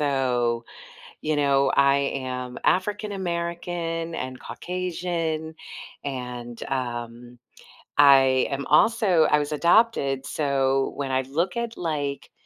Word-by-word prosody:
o, 125 -5 0 0.6
you 155 0 0
know, 140 -1 +3
I 140 0 +5 0.3
am 125 -1 -5
African 210 +3 +1
American 170 -2 -3
and 130 0 -5
Caucasian, 170 -3 -3 0.5
and, 125 -3 -6
um, 120 -2 -5 0.6
I 135 -2 +6
am 140 0 -3
also 185 -2 +4
I - - +4
was 150 0 -2
adopted, 160 - +2
so 135 -2 0
when 135 -2 -3
I 130 0 +2
look 165 +8 -2
at, 235 -1 -3
like, 145 -4 -3
145 Hz, 110 wpm, -25 LUFS, 130-170 Hz, 0.6 s, I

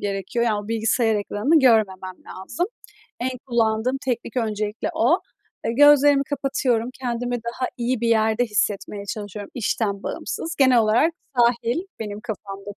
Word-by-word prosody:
gerekiyor. 205 +4 -2
Yani 215 -3 +1
o - - -12
bilgisayar 225 0 +1
ekranını 210 +9 +2
görmemem 195 -7 +2 0.2
lazım. 190 - -3 0.5
En 250 +2 0 0.2
kullandığım 235 +1 +1
teknik 240 -1 -3
öncelikle 215 -2 -2
o. - - +3 0.5
Eee, 225 - 0
gözlerimi 290 +1 +6
kapatıyorum, 265 -4 -1
kendimi 245 -1 -2
daha 240 +2 -3
iyi 245 0 -1
bir 235 - 0
yerde 220 +1 +3
hissetmeye 205 -2 -2
çalışıyorum 205 0 -6
işten 210 -3 -1
bağımsız. 330 +1 -4
Genel 260 -3 +5
olarak 230 +9 +3 0.3
sahil 235 +3 +2 0.2
benim 210 -1 -5
kafamdaki. 205 -2 -7
230 Hz, 135 wpm, -23 LUFS, 210-250 Hz, 0.5 s, gözlerimi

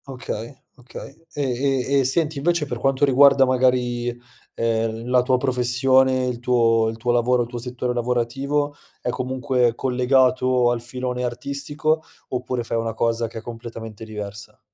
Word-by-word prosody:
Okay, 125 -3 -6 0.3
okay. 135 +5 -12
E 145 - -3 0.5
e 140 0 +3
e - - +3
senti, 150 +3 +1
invece 170 +1 +1
per 120 -4 -5
quanto 135 +2 +2
riguarda 140 0 +6
magari, 125 -1 +1 0.5
ehm, 115 0 -1
la 125 0 +4
tua 125 +1 +2
professione, 130 0 +2
il 125 -2 -3
tuo 115 -2 +3
il 110 - -6
tuo 120 +2 0
lavoro, 120 +1 +2
il - - -7
tuo 120 0 -6
settore 125 0 -3
lavorativo, 125 +5 -1 0.3
è - - -3
comunque 130 -1 0
collegato 130 -1 +2
al 120 -1 -2
filone 125 +1 -4
artistico, 140 +5 -2 0.3
oppure 125 -1 -3
fai 115 - -2
una 115 -1 -3
cosa 115 0 0
che 115 - -10
è - - -5
completamente 115 -2 -8
diversa? 105 -1 -8
125 Hz, 155 wpm, -22 LUFS, 120-130 Hz, 0.5 s, riguarda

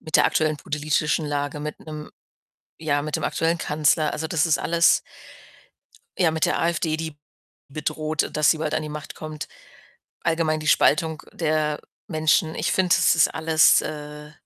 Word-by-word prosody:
mit 155 - -12
der - - +5
aktuellen 155 -1 +1
politischen 150 +1 -1
Lage, 145 0 -3
mit 150 0 -6
'nem 155 -1 -8 0.7
ja, 145 -2 0
mit 150 -1 -5
dem - - -4
aktuellen 165 +1 0
Kanzler, 155 0 +1
also, 160 +1 -4
das 165 0 +1
ist 155 - +2
alles 170 0 +3 1.2
ja, 175 -3 +3
mit 160 -1 +1
der - - 0
AfD, 165 -1 0
die 160 -2 -6 0.5
bedroht, 155 +1 -2
dass 150 -1 +4
sie 160 - -2
bald 155 -1 -2
an - - -1
die 155 - -6
Macht 150 0 -8
kommt, 155 -1 -7 0.7
allgemein 160 -1 0
die 155 - -5
Spaltung 160 +1 +3
der 155 -2 0 0.3
Menschen. 160 -1 +1
Ich - - -1
finde, 185 -2 +3
das - - +3
ist 155 - +5
alles, 160 0 +4
äh, 150 0 -7
155 Hz, 165 wpm, -23 LUFS, 150-160 Hz, 1.2 s, der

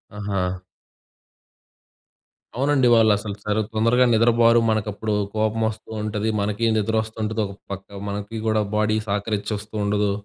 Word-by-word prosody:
ఆహా! 95 -3 -2 2.0
అవునండి. 135 -1 +2
వాళ్ళసలు 105 -2 +2
సరే 105 +1 +1
తొందరగా 115 +3 +3
నిద్రబోరు. 115 +1 +5
మనకప్పుడు 110 0 -1 0.2
కోపం 110 +1 0
ఒస్తూంటది. 110 0 -4
మనకీ 105 +3 0
నిద్ర 110 +1 0
ఒస్తుంటది 110 0 -3
ఒక 100 - -10 0.2
పక్క. 100 0 -6 0.2
మనకి 105 +2 -5
గూడా 110 -1 +2 0.2
బాడీ 110 0 +2
సహకరించ 105 +1 -2
ఒస్తూండదు. 105 -1 -1
110 Hz, 110 wpm, -23 LUFS, 105-110 Hz, 2.0 s, నిద్రబోరు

